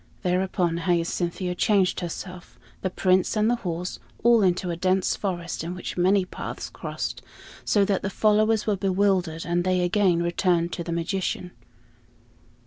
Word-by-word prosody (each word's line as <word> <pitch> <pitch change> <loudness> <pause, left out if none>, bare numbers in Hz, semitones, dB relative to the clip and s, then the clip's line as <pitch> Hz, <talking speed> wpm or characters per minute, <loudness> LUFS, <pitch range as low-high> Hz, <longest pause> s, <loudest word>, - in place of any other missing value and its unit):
Thereupon 180 -2 0
Hyacinthia 175 +1 -1
changed 195 0 +2
herself, 180 +1 -7 0.2
the 190 - -1
Prince 185 +2 +2
and 215 +2 +3
the 240 - +1
horse, 180 -3 -4 0.2
all 235 -1 +6
into 180 -1 +1
a - - -2
dense 185 +2 +1
forest 175 -5 -3
in 175 +2 -4
which 180 - -6
many 185 +2 +3
paths - - -6
crossed, - - -5 0.4
so 205 -2 +3
that 195 -1 0
the 195 - -2
followers 215 +1 +2
were 210 - +1
bewildered; 190 -4 +1
and 175 0 0
they 185 0 +1
again 180 -2 +2
returned 170 0 +1
to 170 - -3
the 170 - -5
magician. 180 +1 -2
185 Hz, 150 wpm, -25 LUFS, 175-195 Hz, 0.4 s, all